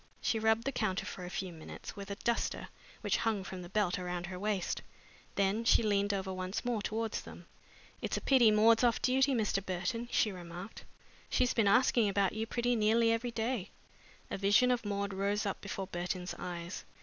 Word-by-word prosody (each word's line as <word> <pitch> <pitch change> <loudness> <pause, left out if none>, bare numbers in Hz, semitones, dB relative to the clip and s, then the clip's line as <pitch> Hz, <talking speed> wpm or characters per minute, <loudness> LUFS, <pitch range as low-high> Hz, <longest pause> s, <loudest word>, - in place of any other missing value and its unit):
She 225 - 0
rubbed 220 +1 +3
the 275 - -1
counter 195 -6 -1
for 185 -3 -6
a - - -6
few 185 -1 -4
minutes 160 +6 -9
with 200 -1 -8
a 200 - -3
duster 235 +3 -1 0.3
which - - +1
hung 220 -4 0
from 185 -1 -7
the 175 - -9
belt 195 -3 +1
around 180 -1 -3
her 180 0 -6
waist. 205 -2 -1 0.5
Then 200 +3 +1
she 230 - +5
leaned 205 -1 +2
over 190 -1 -2
once 185 +5 -4
more 240 -3 0
towards 220 +1 -2
them. - - -11 0.6
"It's - - -1
a - - -4
pity 255 -5 +5
Maud's 220 +2 +5
off 235 -2 +3
duty, 265 +1 +3
Mr. 210 -4 0
Burton," 190 +6 -3
she 215 - +2
remarked. 180 +2 -9 0.4
"She's 250 -1 +2
been 225 -3 +3
asking 235 0 +4
about 195 -1 +1
you 220 +1 -3
pretty 245 +1 +1
nearly 225 +1 +3
every 230 +2 0
day." 230 -3 -2 0.6
A - - -3
vision 205 +6 +4
of 245 -2 0
Maud 200 -1 -2
rose 200 +2 0
up 200 - -3
before 200 -1 -4
Burton's 180 -1 -3
eyes. 175 0 -5
205 Hz, 195 wpm, -33 LUFS, 190-230 Hz, 0.6 s, she